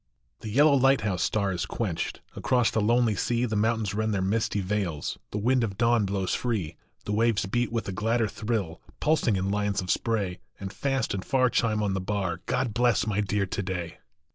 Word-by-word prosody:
HE 110 - -6
yellow 145 +7 +5
lighthouse 125 -8 +3
star 100 -3 +1
is 90 - -2
quenched 95 -8 -3
Across 125 -3 +2
the 110 - +1
lonely 120 +1 +3
sea; 120 +4 0
The 110 -3 -2
mountains 110 -1 +1
rend 110 0 0
their 95 - 0
misty 105 +1 0
veils, 95 -6 -2
The - - -4
wind 125 +4 +2
of 100 -4 -3
dawn 115 -2 +3
blows 95 -1 -1
free; 105 -11 -2 0.3
The - - -3
waves 110 -1 +2
beat 120 +5 -1
with 115 -1 -2
a - - -2
gladder 110 +4 +1
thrill, 105 -7 -3 0.2
Pulsing 150 -8 +2
in 95 +1 -1
lines 105 -1 0
of 90 -1 -1
spray, 100 -6 -1 0.2
And 95 0 -6
fast 135 -4 -1
and 95 -1 -3
far 130 -2 +2
chime 110 -2 +1
on 100 -2 0
the 95 - -1
bar 90 -3 -2
God 120 -5 0
bless 120 -3 +2
my 105 -1 0
Dear 100 -1 0
to 95 - -3
day 90 -3 -4
105 Hz, 200 wpm, -27 LUFS, 95-115 Hz, 0.3 s, yellow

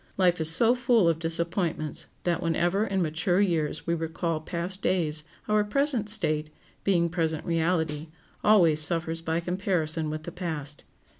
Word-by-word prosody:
Life 180 -3 +3
is 160 - -1
so 225 +9 +4
full 245 -6 +3
of 165 -1 +1
disappointments 165 -2 -1 0.2
that 175 -2 0
whenever 175 +5 +1
in 190 -2 0
mature 175 +4 0
years 160 -6 0
we 170 - 0
recall 165 0 -2
past 175 +4 -3
days, 155 -5 0 0.2
our 210 0 +3
present 245 -1 0
state, 155 -8 +3 0.3
being 175 -4 +2
present 160 -2 -2
reality, 165 -2 0 0.4
always 170 -8 +5
suffers 165 +1 -1
by 165 0 -1
comparison 170 -3 -1
with 155 0 -5
the 175 - -6
past. 155 -5 -4
170 Hz, 150 wpm, -27 LUFS, 160-190 Hz, 0.4 s, always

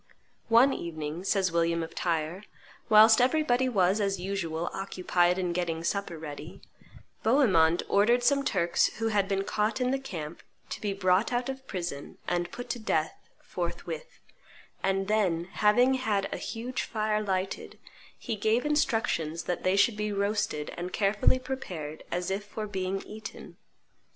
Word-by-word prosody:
"One 245 +4 +6
evening," 160 0 -5
says 195 -3 +1
William 170 0 +1
of 165 - -8
Tyre, 170 +3 -2 0.4
"whilst 220 +1 +8
everybody 260 -2 +2
was, 195 -2 +2
as 195 -2 0
usual, 175 -3 -3
occupied 180 -2 +1
in 180 -2 -1
getting 170 -2 -2
supper 195 -1 -2
ready, 155 0 -8 0.6
Bohemond 185 - +4
ordered 235 +5 +3
some 275 +3 +3
Turks 175 -8 +2
who 225 0 0
had 205 -3 +1
been 195 -1 0
caught 210 +4 -1
in 250 0 +1
the 270 - 0
camp 170 - -7 0.3
to - - -5
be 205 - -1
brought 195 +2 +2
out 245 +1 -1
of 265 0 -6
prison 170 -7 -5
and 175 0 -1
put 245 - -7
to 245 - -3
death 220 - -2
forthwith; - - -5 0.6
and 195 0 0
then, 195 -6 +1
having 245 +6 +4
had 215 -7 0
a - - -3
huge 245 +2 -4
fire 215 -1 -1
lighted, 190 -2 -3 0.4
he 230 - -4
gave 220 +5 +1
instructions 225 - 0
that 180 - -2
they 185 +1 +2
should 210 +2 +3
be 210 0 -1
roasted 200 -6 -1
and 180 +1 -5
carefully 205 +4 +3
prepared 180 - -6
as 180 +1 -2
if 195 +2 -2
for 215 +1 -6
being 195 -1 -3
eaten. 215 +1 -9
200 Hz, 155 wpm, -28 LUFS, 175-225 Hz, 0.6 s, whilst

